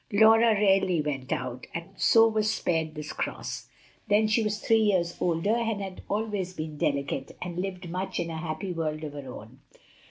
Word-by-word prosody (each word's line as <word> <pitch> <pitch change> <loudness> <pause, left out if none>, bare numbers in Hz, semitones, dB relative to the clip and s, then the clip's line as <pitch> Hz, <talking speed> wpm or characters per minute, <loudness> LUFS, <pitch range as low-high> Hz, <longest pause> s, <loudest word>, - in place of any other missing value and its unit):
Laura 220 +2 +6
rarely 195 -4 +3
went 140 -3 -3
out, 125 0 -3
and 170 0 -5
so 225 0 +6
was 215 -1 +1
spared 160 -6 -1
this 150 0 -6
cross; - - -4 0.4
then 210 +1 +4
she 220 +2 +3
was 210 -1 0
three 225 +1 +3
years 185 -5 +2
older, 180 +7 +1
had 200 -4 -3
always 205 -3 -2
been 155 -2 -5
delicate, 140 -2 -2
and 175 -1 -5
lived 185 -1 -4
much 185 +3 -3
in 170 -1 -2
a 160 - -4
happy 170 +4 -4
world 155 -2 -2
of 150 -2 -5
her 140 -3 -7
own. 115 +3 -11
180 Hz, 180 wpm, -28 LUFS, 155-210 Hz, 0.4 s, Laura